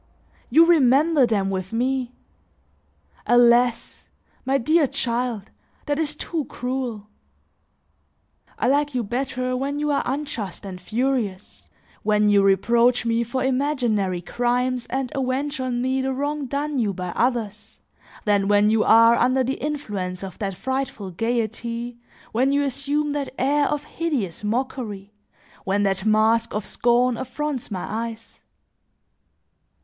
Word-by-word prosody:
You 330 Hz, +1 st, +6 dB
remember 295 Hz, -2 st, +4 dB
them 200 Hz, -4 st, 0 dB
with 190 Hz, -1 st, -4 dB
me! 250 Hz, +1 st, -1 dB, 1.1 s
Alas! 240 Hz, 0 st, +3 dB, 0.4 s
my 270 Hz, +1 st, +2 dB
dear 310 Hz, +4 st, +3 dB
child, 240 Hz, -5 st, -2 dB, 0.3 s
that 290 Hz, +1 st, -1 dB
is 300 Hz, -2 st, -1 dB
too 310 Hz, -1 st, -3 dB
cruel. 250 Hz, -5 st, -4 dB, 1.5 s
I -, -, 0 dB
like 290 Hz, +1 st, +1 dB
you 245 Hz, -, 0 dB
better 255 Hz, +2 st, -2 dB
when 275 Hz, +3 st, -2 dB
you 295 Hz, 0 st, 0 dB
are 280 Hz, -, +2 dB
unjust 245 Hz, -10 st, -4 dB
and 185 Hz, -2 st, -7 dB
furious, 225 Hz, -2 st, -2 dB, 0.3 s
when 210 Hz, -1 st, +2 dB
you 200 Hz, -1 st, +5 dB
reproach 235 Hz, +6 st, +3 dB
me 230 Hz, 0 st, +1 dB
for 240 Hz, +3 st, -2 dB
imaginary 245 Hz, -9 st, 0 dB
crimes 245 Hz, +3 st, -1 dB
and 265 Hz, -1 st, -3 dB
avenge 270 Hz, +2 st, -2 dB
on 250 Hz, -1 st, -1 dB
me 260 Hz, +1 st, 0 dB
the 265 Hz, 0 st, -1 dB
wrong 285 Hz, +1 st, -2 dB
done 285 Hz, +1 st, -2 dB
you 210 Hz, -4 st, 0 dB
by 180 Hz, -1 st, -5 dB
others, 225 Hz, 0 st, -2 dB, 0.5 s
than 205 Hz, -2 st, +2 dB
when 205 Hz, +1 st, +4 dB
you 220 Hz, 0 st, +3 dB
are 230 Hz, +1 st, +6 dB
under 255 Hz, +2 st, +2 dB
the 265 Hz, +2 st, -3 dB
influence 205 Hz, -12 st, -4 dB
of 190 Hz, -3 st, -8 dB
that 195 Hz, -3 st, -3 dB
frightful 260 Hz, -6 st, -3 dB
gaiety, 235 Hz, +3 st, -3 dB, 0.3 s
when 255 Hz, +4 st, +2 dB
you 285 Hz, 0 st, +2 dB
assume 285 Hz, +2 st, -1 dB
that 285 Hz, -2 st, -4 dB
air 285 Hz, +3 st, +2 dB
of 295 Hz, -1 st, -2 dB
hideous 275 Hz, -, -3 dB
mockery, 215 Hz, -3 st, -3 dB, 0.5 s
when 200 Hz, +1 st, 0 dB
that 195 Hz, +1 st, 0 dB
mask 220 Hz, +1 st, +2 dB
of 210 Hz, -1 st, -2 dB
scorn 240 Hz, +3 st, +2 dB
affronts 265 Hz, +1 st, -4 dB
my 190 Hz, -4 st, -4 dB
eyes. 225 Hz, +1 st, -6 dB
245 Hz, 135 wpm, -23 LUFS, 215-270 Hz, 1.5 s, You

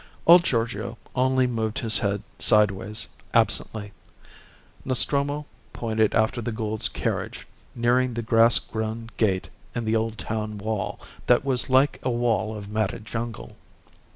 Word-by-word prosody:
Old 175 Hz, +1 st, +8 dB
Giorgio 115 Hz, -, -2 dB, 0.2 s
only 130 Hz, 0 st, +2 dB
moved 110 Hz, -3 st, -2 dB
his 110 Hz, -1 st, +2 dB
head 100 Hz, -1 st, -1 dB, 0.2 s
sideways 105 Hz, 0 st, +2 dB, 0.3 s
absently. 105 Hz, -2 st, +1 dB, 0.9 s
Nostromo 140 Hz, +3 st, +2 dB, 0.3 s
pointed 110 Hz, -2 st, 0 dB
after 110 Hz, +2 st, +1 dB
the 120 Hz, -, -3 dB
Goulds' 110 Hz, -1 st, -2 dB
carriage, -, -, -3 dB, 0.3 s
nearing 120 Hz, +1 st, +1 dB
the 115 Hz, -, -3 dB
grass 115 Hz, +1 st, +5 dB
grown 110 Hz, +1 st, -4 dB
gate 95 Hz, -4 st, 0 dB, 0.3 s
in 120 Hz, -, -2 dB
the 110 Hz, +1 st, +1 dB
old 110 Hz, 0 st, -1 dB
town 110 Hz, -1 st, -4 dB
wall 105 Hz, -1 st, -3 dB, 0.3 s
that 125 Hz, +2 st, +4 dB
was 130 Hz, -2 st, 0 dB
like 130 Hz, +2 st, +3 dB
a 130 Hz, -, -1 dB
wall 115 Hz, -3 st, 0 dB
of 100 Hz, -1 st, -8 dB
matted 105 Hz, 0 st, -2 dB
jungle. 115 Hz, 0 st, -6 dB
115 Hz, 135 wpm, -25 LUFS, 110-120 Hz, 0.9 s, Old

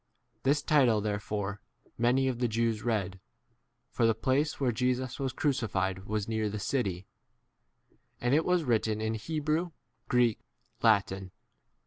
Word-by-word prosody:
This 145 Hz, +2 st, +2 dB
title 130 Hz, -9 st, +4 dB
therefore 105 Hz, -1 st, -3 dB, 0.3 s
many 125 Hz, +3 st, +2 dB
of 125 Hz, -2 st, -1 dB
the 125 Hz, -, +2 dB
Jews 115 Hz, -1 st, 0 dB
read, 100 Hz, -5 st, -1 dB, 0.7 s
for 115 Hz, -, +2 dB
the 115 Hz, -, +3 dB
place 135 Hz, +6 st, 0 dB
where 130 Hz, -3 st, +2 dB
Jesus 125 Hz, +2 st, -1 dB
was 135 Hz, -2 st, -1 dB
crucified 105 Hz, -10 st, -1 dB
was 105 Hz, 0 st, -2 dB
near 110 Hz, -1 st, -1 dB
the 105 Hz, -, -4 dB
city; 100 Hz, -5 st, -1 dB
d -, -, -26 dB, 1.1 s
and 125 Hz, +2 st, +1 dB
it 155 Hz, +3 st, +4 dB
was 180 Hz, -1 st, +2 dB
written 110 Hz, -4 st, +1 dB
in 110 Hz, 0 st, -1 dB
Hebrew, 155 Hz, +8 st, -1 dB, 0.4 s
Greek, 120 Hz, -3 st, +3 dB
e -, -, -38 dB, 0.4 s
Latin. 100 Hz, -4 st, +2 dB
115 Hz, 145 wpm, -30 LUFS, 105-130 Hz, 1.1 s, title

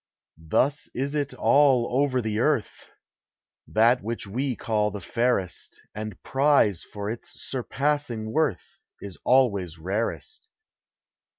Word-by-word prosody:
Thus 130 Hz, -, 0 dB
is 140 Hz, +3 st, -2 dB
it 145 Hz, -1 st, -2 dB
all 135 Hz, -3 st, +3 dB
over 130 Hz, -4 st, +1 dB
the 110 Hz, -1 st, -1 dB
earth! 125 Hz, -3 st, -1 dB, 0.8 s
That 115 Hz, +3 st, +3 dB
which 115 Hz, +2 st, -4 dB
we 125 Hz, +6 st, -2 dB
call 105 Hz, -2 st, 0 dB
the 105 Hz, 0 st, -6 dB
fairest, 115 Hz, -2 st, -2 dB
And 105 Hz, -2 st, -6 dB
prize 135 Hz, -, +3 dB
for 100 Hz, -1 st, -7 dB
its 115 Hz, -, -8 dB
surpassing 130 Hz, -3 st, -2 dB
worth, 160 Hz, +3 st, -1 dB, 0.2 s
Is 100 Hz, -3 st, -8 dB
always 100 Hz, -10 st, +2 dB
rarest. 110 Hz, -, -4 dB
120 Hz, 115 wpm, -25 LUFS, 105-140 Hz, 0.8 s, all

